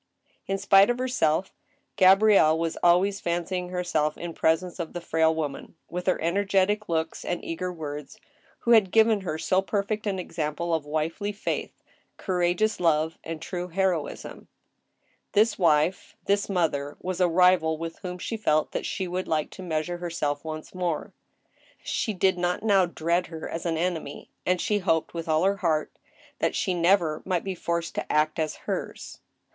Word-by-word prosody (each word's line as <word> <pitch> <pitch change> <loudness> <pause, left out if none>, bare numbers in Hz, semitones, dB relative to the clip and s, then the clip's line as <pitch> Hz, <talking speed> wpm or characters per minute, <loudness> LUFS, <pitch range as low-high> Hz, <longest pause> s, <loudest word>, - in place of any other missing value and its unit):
In 195 - 0
spite 195 +1 +5
of 245 - +1
herself, 190 -9 0 0.4
Gabrielle 190 -4 +6
was 165 0 -1
always 185 +3 +4
fancying 180 +1 -2
herself 175 -4 -1
in 170 -1 -6
pres 160 +2 +2
ence 180 0 -9
of 165 -2 -4
the 175 - -3
frail 160 -1 +2
woman, 150 -3 -4 0.2
with 180 +1 -4
her 185 - +2
energetic 200 +3 +1
looks 160 -1 -2
and 175 - -3
eager 180 +2 -3
words, 150 -4 -7 0.4
who 235 - +1
had 215 -5 +6
given 220 0 +4
her 160 -4 -3
so 185 +4 +1
perfect 210 +2 -2
an 195 -2 -1
example 170 -1 -3
of 155 -2 -1
wifely 160 +7 -2
faith, 205 - -4 0.3
courageous 180 +3 0
love, 160 -2 +1
and 165 -1 -6
true 180 +1 -4
heroism. 180 -3 -2 0.9
This 215 +1 +3
wife, 165 +1 +2
this 200 +1 +1
mother, 150 -6 -1
was 185 0 -3
a 180 - +4
rival 170 -2 +4
with 165 +1 -6
whom 180 -2 -6
she 225 +5 -4
felt 155 -8 +1
that - - -3
she 190 -2 -3
would 180 +1 -3
like 155 -1 -1
to - - -10
measure 175 0 -2
herself 160 -5 -2
once 155 -1 -7
more. 175 -4 -3 0.7
She 220 - -1
did 185 0 +2
not 175 +2 -1
now 195 -4 +4
dread 170 +1 0
her 160 -1 -7
as 165 +1 -4
an 165 -1 0
enemy, 165 -4 -3 0.2
and 180 0 +2
she 210 +3 +1
hoped 165 -4 0
with 165 -1 -5
all 155 +2 +3
her 200 +1 +2
heart 160 -6 0 0.5
that - - 0
she 185 - 0
never 170 -3 +2
might 180 -3 -1
be 195 - -3
forced 170 -1 -3
to - - -4
act 155 +1 +1
as 155 -1 -1
hers. - - -5
175 Hz, 175 wpm, -26 LUFS, 160-190 Hz, 0.9 s, Gabrielle